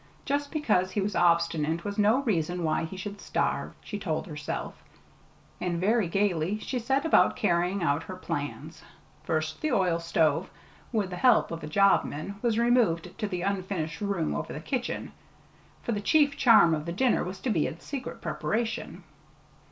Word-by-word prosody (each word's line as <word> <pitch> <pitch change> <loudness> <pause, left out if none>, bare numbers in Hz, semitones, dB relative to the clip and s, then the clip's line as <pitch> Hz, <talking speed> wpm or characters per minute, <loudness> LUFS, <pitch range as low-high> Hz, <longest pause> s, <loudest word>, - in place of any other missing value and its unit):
Just 285 0 -1
because 215 - +1
he 195 - -2
was 200 +1 -1
obstinate 170 -2 +2
was 205 +1 -3
no 220 +7 +4
reason 175 - 0
why 160 0 0
he 185 +4 -8
should 200 +2 -6
starve, - - -1
she 205 - -5
told 165 -4 -2
herself; 150 -4 -5 0.9
and 175 -2 -1
very 210 +2 +2
gayly 190 0 0
she 250 +3 -3
set 270 +5 0
about 185 - +4
carrying 175 +2 +1
out 145 -1 +1
her 185 - -7
plans. 145 -5 -5 0.4
First 155 -1 -2
the 310 - 0
oil 180 -7 +2
stove, 165 0 +1 0.4
with 210 -5 -1
the 180 - -4
help 245 -2 +4
of 165 0 -5
a - - -4
jobman, 195 +1 +1
was 230 -3 +1
removed 235 -8 +2
to 210 - -1
the 180 -3 -3
unfinished 185 -4 -2
room 200 -6 -1
over - - -4
the - - -5
kitchen, 245 - -3 0.7
for - - -2
the 205 -2 -1
chief 285 +5 +3
charm 220 -9 +6
of 155 +1 -3
the - - -2
dinner 240 +8 +2
was 185 +2 -6
to 255 - -1
be 165 -7 +2
its 165 - -9
secret 275 -3 -6
preparation. 230 +1 -3
190 Hz, 175 wpm, -28 LUFS, 165-225 Hz, 0.9 s, charm